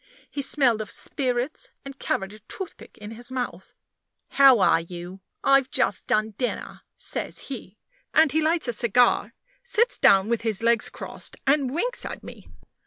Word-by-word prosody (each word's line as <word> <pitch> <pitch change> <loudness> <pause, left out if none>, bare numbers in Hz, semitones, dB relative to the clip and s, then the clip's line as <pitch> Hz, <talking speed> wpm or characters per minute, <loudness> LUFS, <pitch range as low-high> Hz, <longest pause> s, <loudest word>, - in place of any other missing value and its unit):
He 285 - -3
smelled 260 -5 +3
of 215 - -6
spirits, 265 - -2 0.2
and 275 0 -9
carried 195 +1 -2
a 215 - -12
toothpick 330 - -9
in 210 +1 -9
his 240 +3 -7
mouth. 255 -1 -4 0.6
"How 270 -3 +7
are 185 - +4
you? 175 +2 -9 0.2
I've 275 -1 +4
just 255 -8 0
done 215 +1 +1
dinner," 250 - -3 0.2
says - - -4
he; - - -7 0.3
and 315 -2 +5
he 315 - +2
lights 320 -1 +1
a 240 - -1
cigar, 235 +2 +2 0.3
sits 485 0 +1
down 195 +1 +5
with 235 -1 0
his 225 -2 -2
legs 235 -1 +2
crossed, - - -8
and 275 -1 +3
winks 475 - -2
at - - -6
me. - - -11
250 Hz, 165 wpm, -25 LUFS, 215-285 Hz, 0.6 s, How